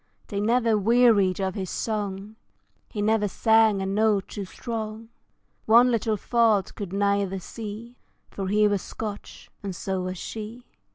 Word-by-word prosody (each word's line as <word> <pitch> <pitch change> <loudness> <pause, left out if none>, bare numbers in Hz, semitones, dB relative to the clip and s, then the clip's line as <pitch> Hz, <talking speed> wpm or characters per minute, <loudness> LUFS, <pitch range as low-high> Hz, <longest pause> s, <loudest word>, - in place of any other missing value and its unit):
They 200 - -2
never 225 0 +2
wearied 215 -4 +4
of 190 -1 -1
his 190 -4 -4
song, 205 -1 -3 0.5
He 205 -3 -3
never 215 -1 +2
sang 220 0 +3
a - - -2
note 205 0 +1
too 200 - -5
strong, 220 +1 -6 0.6
One 240 +3 +6
little 220 -2 0
fault 225 -2 +2
could 200 -4 -6
neither 200 -1 0
see, 225 +5 -8 0.3
For 195 -1 -4
he 210 +2 +3
was 205 -2 0
Scotch, 210 -2 -8
and 195 -3 -5
so 190 +1 -3
was 185 0 -4
she. 225 +5 -7
210 Hz, 150 wpm, -25 LUFS, 195-225 Hz, 0.6 s, One